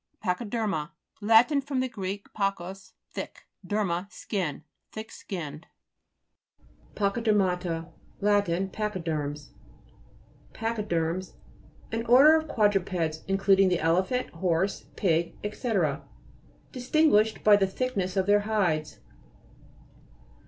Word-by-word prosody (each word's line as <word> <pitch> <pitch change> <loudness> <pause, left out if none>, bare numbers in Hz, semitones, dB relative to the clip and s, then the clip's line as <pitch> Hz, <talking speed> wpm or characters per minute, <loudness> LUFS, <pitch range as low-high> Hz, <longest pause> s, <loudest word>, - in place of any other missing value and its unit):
PA'CHYDE'RMA 205 -4 -1 0.3
Lat. 225 +4 +6
fr. 280 0 -5
gr. 245 -7 -2 0.3
pachus, 195 -1 -3 0.2
think, - - -7 0.2
derma, 195 -1 -1
skin. 180 -9 -3 0.3
Thick 220 +1 -8
skin 170 -7 -6
ned. 155 +4 -13 1.3
PA'CHYDE'RMATA 190 -6 0 0.3
Lat. 205 0 +3
Pa'chy 190 +2 -2
de'rms. 150 -2 -3 1.0
PACHYUE'RMS 185 -6 -2 0.6
An 225 0 -2
order 275 +6 +8
of 315 0 0
quadru 205 -7 +2
peds, 165 -4 -3
including 195 0 +4
the 180 - +2
elephant, 185 +10 +1
horse, 175 +2 -1
pig, 170 -3 +1 0.2
&c., 240 +1 -3 1.0
distinguished 250 -4 +2
by 210 -1 +7
the 195 -1 +2
thick 255 +6 -3
ness 185 0 -1
of 190 - +2
their 205 +1 +5
hides. 185 -8 0
195 Hz, 105 wpm, -27 LUFS, 175-220 Hz, 1.3 s, order